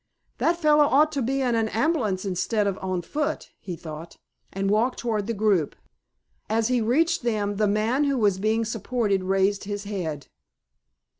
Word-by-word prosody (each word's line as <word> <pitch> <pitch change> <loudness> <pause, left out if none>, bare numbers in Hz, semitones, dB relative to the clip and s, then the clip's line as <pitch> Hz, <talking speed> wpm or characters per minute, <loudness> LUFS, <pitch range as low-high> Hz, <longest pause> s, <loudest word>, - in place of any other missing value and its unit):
"That 340 +1 +2
fellow 300 -3 +4
ought 300 +2 +4
to 285 -3 -2
be 270 +3 0
in 245 -2 +1
an 225 -1 +1
ambulance 225 - 0
instead 200 +3 0
of 200 -2 -1
on 185 -2 -2
foot," 300 - -3
he 180 -3 -6
thought, 160 0 -9 0.4
and 195 0 -2
walked 220 +5 +1
toward 220 -4 -2
the 230 - -1
group. 200 -7 +1 0.7
As 225 +1 +1
he 250 -2 +2
reached 320 +9 +2
them 210 -4 -1
the 210 0 +2
man 220 +8 +1
who 280 -1 +1
was 205 -5 +2
being 220 +3 +1
supported 220 -3 -1
raised 195 +2 +1
his 205 0 -4
head. 170 -9 -4
215 Hz, 170 wpm, -25 LUFS, 195-255 Hz, 0.7 s, fellow